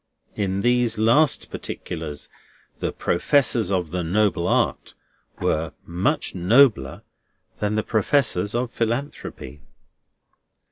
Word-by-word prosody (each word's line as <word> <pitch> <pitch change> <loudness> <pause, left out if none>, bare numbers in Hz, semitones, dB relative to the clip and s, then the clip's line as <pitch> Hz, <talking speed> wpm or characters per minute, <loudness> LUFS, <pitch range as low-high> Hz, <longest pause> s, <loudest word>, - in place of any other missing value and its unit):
In 100 -1 -1
these 120 -1 +2
last 120 +8 +3
particulars 80 -4 -6 0.5
the - - -2
Professors 120 +3 +1
of 90 -5 -1
the 90 0 -2
Noble 95 0 +1
Art - - 0 0.4
were 80 -1 -1
much 85 +3 -1
nobler 95 - +3 0.6
than 105 0 -1
the 110 - 0
Professors 110 -3 +1
of 120 0 -1
Philanthropy. 115 - -4
105 Hz, 100 wpm, -23 LUFS, 85-120 Hz, 0.6 s, last